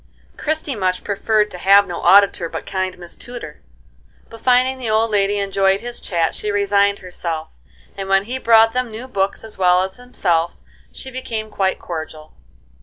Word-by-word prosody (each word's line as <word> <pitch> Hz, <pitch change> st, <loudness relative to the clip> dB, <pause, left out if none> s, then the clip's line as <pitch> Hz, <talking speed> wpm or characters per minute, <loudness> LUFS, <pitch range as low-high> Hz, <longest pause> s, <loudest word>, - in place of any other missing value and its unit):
Christie 310 Hz, -2 st, -2 dB
much 185 Hz, -4 st, -1 dB
preferred 210 Hz, +1 st, +1 dB
to 180 Hz, -, -8 dB
have 200 Hz, +2 st, +6 dB
no 175 Hz, -3 st, -6 dB
auditor 195 Hz, -4 st, +5 dB
but -, -, -6 dB
kind 185 Hz, -1 st, -3 dB
Miss 175 Hz, -1 st, -9 dB
Tudor; 240 Hz, -11 st, -9 dB, 0.7 s
but 225 Hz, -1 st, -12 dB
finding 255 Hz, +1 st, +3 dB
the 240 Hz, -3 st, -3 dB
old 220 Hz, +1 st, +2 dB
lady 205 Hz, 0 st, +2 dB
enjoyed 195 Hz, -1 st, +1 dB
his 240 Hz, 0 st, -7 dB
chat 165 Hz, -3 st, -1 dB
she 210 Hz, -, -4 dB
resigned 200 Hz, 0 st, +2 dB
herself, 165 Hz, -3 st, -5 dB, 0.5 s
and 195 Hz, -1 st, -6 dB
when 195 Hz, 0 st, +4 dB
he 250 Hz, +5 st, -5 dB
brought 225 Hz, -2 st, +5 dB
them 250 Hz, -1 st, -1 dB
new 225 Hz, +4 st, -8 dB
books 195 Hz, -4 st, -2 dB
as 220 Hz, -3 st, -9 dB
well 180 Hz, 0 st, +4 dB
as 190 Hz, 0 st, -6 dB
himself, 175 Hz, -9 st, -1 dB, 0.4 s
she 265 Hz, -, -10 dB
became 225 Hz, -4 st, -5 dB
quite 190 Hz, -1 st, 0 dB
cordial. 155 Hz, -2 st, -7 dB
200 Hz, 175 wpm, -19 LUFS, 185-225 Hz, 0.7 s, have